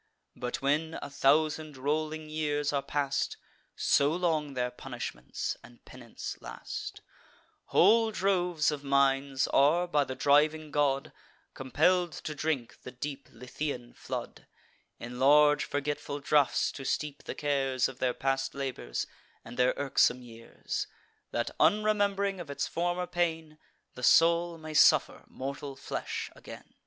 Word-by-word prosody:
But, 125 +2 -4
when 155 +4 +1
a 145 - -8
thousand 155 +1 +2
rolling 155 +3 -2
years 150 -1 -1
are 140 - +1
past, 140 0 -1 0.4
(So 140 +1 +3
long 155 -5 0
their 125 -1 -1
punishments 120 - -5
and 120 - -17
penance 120 -3 -8
last,) - - -7 0.6
Whole 225 +4 +5
droves 180 -6 +1
of 145 -1 -5
minds 135 -1 +2
are, 160 +6 +4
by 150 -4 +2
the 130 - -5
driving 150 +3 +3
god, 140 -2 +1 0.4
Compell'd 170 +6 +2
to 155 - -5
drink 145 -5 -3
the - - -8
deep 140 +2 -6
Lethaean 125 +1 -5
flood, - - -7 0.5
In 120 +1 -7
large 150 +2 +5
forgetful 145 0 -3
draughts 140 -3 +2
to 135 - -8
steep 145 +1 -3
the - - -5
cares 135 -3 +1
Of 130 0 -10
their 125 -1 0
past 135 0 -1
labours, 130 - -3 0.4
and 115 - -9
their 125 +1 +2
irksome 130 -2 +2
years, 115 -1 -6 0.4
That, 120 - -2
unrememb'ring 200 +1 +2
of 170 -4 -7
its 140 - -2
former 175 +1 -1
pain, 160 -3 -2 0.3
The 125 - -10
soul 170 +4 +4
may 155 -1 -8
suffer 150 - +4
mortal 140 +1 -6
flesh 135 - -5
again." - - -12
145 Hz, 135 wpm, -30 LUFS, 135-160 Hz, 0.6 s, Whole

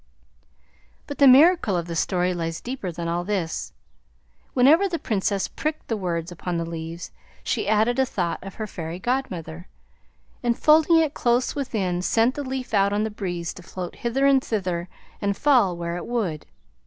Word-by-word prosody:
But 285 - -7
the 280 - +7
miracle 270 - +6
of 170 - -2
the 170 -1 -5
story 180 +1 +1
lies 165 -1 -3
deeper 245 -8 -5
than 170 0 -5
all 170 +1 -1
this. 180 -4 -3 0.8
Whenever 305 +10 +5
the 340 - -1
Princess 200 - -1
pricked 310 0 -4
the 225 - +1
words 175 -4 -3
upon 175 0 -4
the 165 - -2
leaves 165 +1 -6 0.3
she - - -1
added 220 +4 +2
a 265 - +4
thought 175 -6 -2
of 195 -1 -9
her 220 - -4
Fairy 165 -4 -6
Godmother, 180 -8 -3 0.7
and 240 -1 0
folding 315 +2 +5
it 315 -3 +2
close 240 +1 +1
within, 200 - -2
sent 230 +6 +2
the 290 - -4
leaf 260 -2 -5
out 200 -1 +3
on 210 +1 +1
the 220 - -2
breeze 175 -5 -4
to 185 - -11
float 180 0 -7
hither 250 +4 0
and 275 -1 +4
thither 180 -5 -2 0.3
and 200 -1 0
fall 245 - +3
where 170 0 -3
it 175 - -7
would. 205 -11 -2
200 Hz, 180 wpm, -24 LUFS, 175-255 Hz, 0.8 s, the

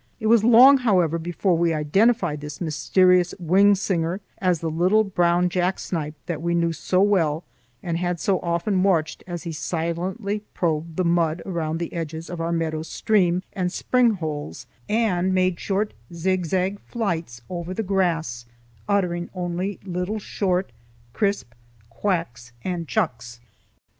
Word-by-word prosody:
It 220 - -5
was 225 -1 +5
long, 250 +4 +8
however, 180 -9 +2
before 175 +2 0
we 165 -1 +1
identified 155 +1 +2
this 150 0 -7
mysterious 180 +3 +3
wing 195 +4 +4
singer 185 -2 -1 0.2
as 180 -3 +1
the 165 - -2
little 185 +7 +3
brown 175 -2 +2
jack 180 +1 0
snipe 155 -3 -4
that 170 -3 -4
we 170 0 0
knew 170 -1 +1
so 180 +4 0
well 170 -6 +2 0.4
and 170 -1 -2
had 175 -1 -1
so 190 +2 +1
often 170 +3 0
watched 170 -5 +1
as 175 -2 -5
he 170 - -4
silently 175 +6 -3 0.2
probed 165 -1 -1
the 185 - +1
mud 170 -1 +1
around 165 -4 -2
the 170 0 -5
edges 165 0 -5
of 175 -2 -4
our 165 +1 -1
meadow 160 -2 -1
stream 180 +1 +1
and 180 -2 -1
spring 245 +3 +2
holes, 150 -7 -5 0.2
and 190 -5 +1
made 185 -2 +1
short 205 +2 -1 0.2
zigzag 185 +2 -1
flights 165 - -4
over 175 0 -5
the 220 +4 -2
grass 165 - -1 0.4
uttering 175 -4 0
only 180 +2 -3
little 180 +3 -2
short, 190 -2 -1 0.4
crisp 200 - -1 0.4
quacks 120 - -2
and 175 -3 -3
chucks. 125 - -2
175 Hz, 150 wpm, -23 LUFS, 165-190 Hz, 0.4 s, long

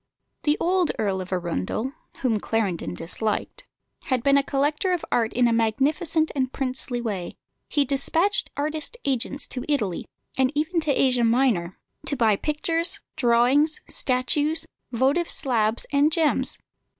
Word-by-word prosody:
The 295 0 +1
old 360 -1 +2
Earl 195 -3 -1
of 185 - -8
Arundel 180 - -2 0.3
(whom 230 -5 +2
Clarendon 190 - -2
disliked) 210 - -2 0.4
had 255 -4 0
been 280 0 +4
a 280 - +5
collector 295 +6 0
of 355 - -2
art 225 -2 +1
in 245 0 +3
a 235 - +2
magnificent 295 - +1
and 260 -2 0
princely 255 -2 -3
way. 205 -7 -4 0.3
He 290 -1 +2
despatched 320 +9 +2
artist 310 +9 -2
agents 275 +1 -1
to 250 - -4
Italy, 215 - -1 0.3
and 260 0 +3
even 315 +4 0
to 310 -2 +1
Asia 255 -3 +2
Minor, 225 -7 +1 0.3
to 280 0 0
buy 225 -4 +3
pictures, 325 - -1 0.2
drawings, 265 +4 +3
statues, 295 +5 +1 0.3
votive 270 +8 +1
slabs, 230 -6 +1
and 290 +2 +3
gems. 320 -2 +1
265 Hz, 140 wpm, -24 LUFS, 230-300 Hz, 0.4 s, a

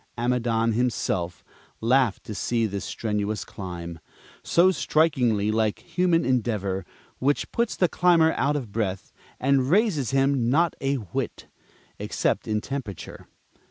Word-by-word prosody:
Amidon 120 -1 +1
himself 105 -7 -1 0.4
laughed 120 -1 +2
to 110 - -7
see 115 +3 0
this 100 -2 -3
strenuous 105 -1 -2
climb, 85 -3 -7 0.4
so 180 +2 +4
strikingly 125 - +2
like 110 -1 +1
human 175 -4 +1
endeavor, 105 -7 -1 0.3
which 140 +2 0
puts 235 -1 0
the 180 - +3
climber 170 -2 +4
out 140 +5 +1
of 125 -8 -4
breath, 100 -4 -3 0.3
and 135 -1 +2
raises 180 - +2
him 135 -2 +2
not 165 +6 +2
a 135 +1 +1
whit 105 -9 -5 0.5
except - - -1
in 105 -1 0
temperature. 125 - -6
120 Hz, 125 wpm, -25 LUFS, 105-140 Hz, 0.5 s, so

